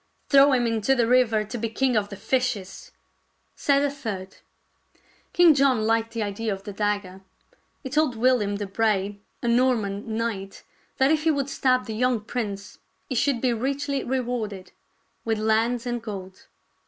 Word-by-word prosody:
" - - -43
Throw 280 0 +7
him 250 -2 +2
into 230 +3 +1
the 240 -3 +2
river 230 -3 +3
to 215 +3 -6
be 230 +1 -2
king 255 +2 0
of 205 -2 0
the 200 - -7
fishes," 250 - -2 0.6
said 280 0 +2
a 285 - +1
third. 200 -9 -6 0.9
King 345 -2 +6
John 270 -5 +3
Hked 225 +1 +1
the 230 -1 -3
idea 210 +2 -3
of 195 0 -5
the 205 -1 -7
dagger. 205 -2 -2 0.6
He 265 - -6
told 300 -3 +2
WiUiam 220 -4 +2
de 205 - -3
Bray, 200 -1 0 0.2
a - - -1
Norman 225 -3 +1
knight, 200 -4 -4 0.3
that 265 +2 +3
if 315 -1 +2
he 320 - +2
would 280 -3 0
stab 255 -2 +1
the 220 - -5
young 250 +1 +1
prince 210 -3 -5 0.3
he - - -2
should 255 0 +1
be 250 -2 +2
richly 275 +4 -2
rewarded 240 -7 -3 0.5
with 225 -1 0
lands 225 +3 +1
and 240 -1 -2
gold. 190 -4 -8
230 Hz, 170 wpm, -25 LUFS, 210-260 Hz, 0.9 s, Throw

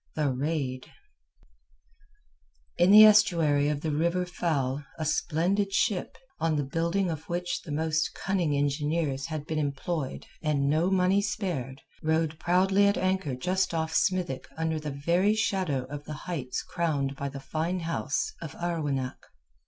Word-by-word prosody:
THE 150 -3 +1
RAID 135 -2 -2 1.9
In 175 - +5
the 215 +2 +10
estuary 165 -9 +4
of 145 -1 -2
the 155 - -1
River 170 +4 +1
Fal 145 -6 -1
a 155 - -3
splendid 175 +6 0
ship, 195 -4 0 0.2
on 165 -1 +1
the 145 - 0
building 170 +6 0
of 160 +1 -7
which 175 0 -2
the 165 - -9
most 160 +1 0
cunning 175 -7 0
engineers 145 0 0
had 155 -2 -5
been 155 0 -2
employed 145 0 -3 0.2
and 145 -3 +1
no 160 +5 +2
money 190 +1 +3
spared, 160 - -3 0.2
rode 160 0 0
proudly 190 +3 +3
at 200 - +2
anchor 185 -7 0
just 185 +6 0
off 160 0 -1
Smithick 180 -9 0
under 160 -1 -1
the 150 0 -5
very 170 +9 +1
shadow 185 -11 0
of 145 +2 -8
the 155 - -6
heights 145 -9 -3
crowned 145 -5 -1
by 140 0 -4
the 140 0 -7
fine 160 +6 -2
house 155 -6 -2
of 160 -4 -7
Arwenack. 145 -7 -3
160 Hz, 150 wpm, -28 LUFS, 145-180 Hz, 1.9 s, the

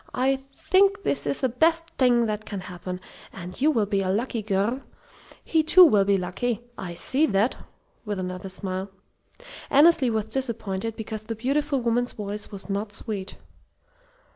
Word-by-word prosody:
I 265 +1 +2
think 395 +6 +2
this - - -1
is 275 - -1
the 260 - +2
best 330 +6 +2
thing 245 -2 +4
that 215 -1 -2
can 200 -3 -6
happen. 180 0 -6 0.3
And 180 +4 -9
you 300 - +5
will 230 -9 +2
be 200 -1 0
a 185 - -1
lucky 225 +4 -1
girl. 210 +5 0 0.6
He, 320 - +2
too, 355 +4 +8
will 205 -10 +4
be 200 0 +3
lucky. 195 +6 -2
I 180 -5 -6
see 285 - +1
that!" 205 +3 +2 0.5
with 210 -3 -3
another 185 +1 -5
smile. 190 0 -4 0.8
Annesley 295 -2 +5
was 220 -2 0
disappointed 225 -3 -3
because 220 -1 -5
the 225 - -4
beautiful 275 +4 0
woman's 240 +1 0
voice 205 0 -5
was 200 -2 -8
not 205 +1 -3
sweet. 200 -2 -5
220 Hz, 165 wpm, -25 LUFS, 195-265 Hz, 0.8 s, too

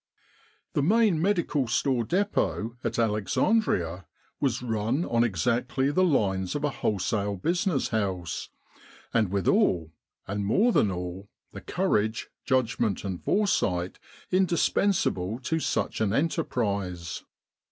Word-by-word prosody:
The - - +1
Main 200 0 +3
Medical 170 - +1
Store 120 +1 +1
Depot 170 - 0
at - - -2
Alexandria 105 - +1 0.3
was 125 -4 0
run 115 +7 0
on 115 0 +2
exactly 120 - 0
the 185 +5 +3
lines 95 - +1
of 145 - -2
a 150 - +1
wholesale 100 -2 -1
business 170 - 0
house, 95 -7 -2 0.6
and 110 -4 +2
with 100 -3 -1
all, 80 -3 +2 0.3
and 100 +1 -2
more 200 - +3
than 105 - +3
all, 90 +2 -5 0.2
the - - -9
courage, 110 +2 0
judgment, 120 -6 +1
and 95 -3 -4
foresight 95 - +1 0.3
indispensable 175 - +1
to 160 +5 -1
such 150 - -1
an 105 -2 +1
enterprise. 100 - -1
115 Hz, 120 wpm, -27 LUFS, 95-150 Hz, 0.6 s, Main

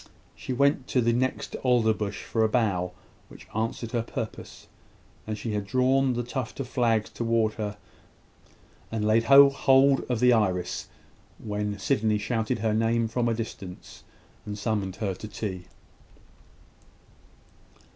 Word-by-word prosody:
She - - -7
went 140 +1 +2
to 130 - +1
the 115 -1 +2
next 130 +2 -1
alder 120 -4 +3
bush 105 -2 -4
for 115 - 0
a 110 - +3
bough, 95 -6 0 0.4
which - - -14
answered 115 +1 -2
her 120 - 0
purpose; 115 -1 -7 0.6
and 110 -1 -3
she 110 0 -4
had 105 -1 -1
drawn 130 +3 +2
the 120 0 -2
tuft 125 0 -5
of 135 - -3
flags 115 -4 +1
towards 115 -2 0
her, 105 -1 -4 1.1
and 110 -1 -1
laid 110 +2 +3
hold 140 0 +6
of 125 -3 0
the 125 +1 +5
iris, 95 -6 0 0.5
when 105 -1 -3
Sydney 105 +1 +1
shouted 110 +1 -1
her 110 - +2
name 115 +1 +1
from 120 +1 0
a 115 - 0
distance, 100 -5 -8 0.4
and 105 0 -6
summoned 100 -3 -2
her 100 -4 -2
to 100 +4 -8
tea. 95 -4 -5
115 Hz, 145 wpm, -26 LUFS, 105-125 Hz, 1.1 s, hold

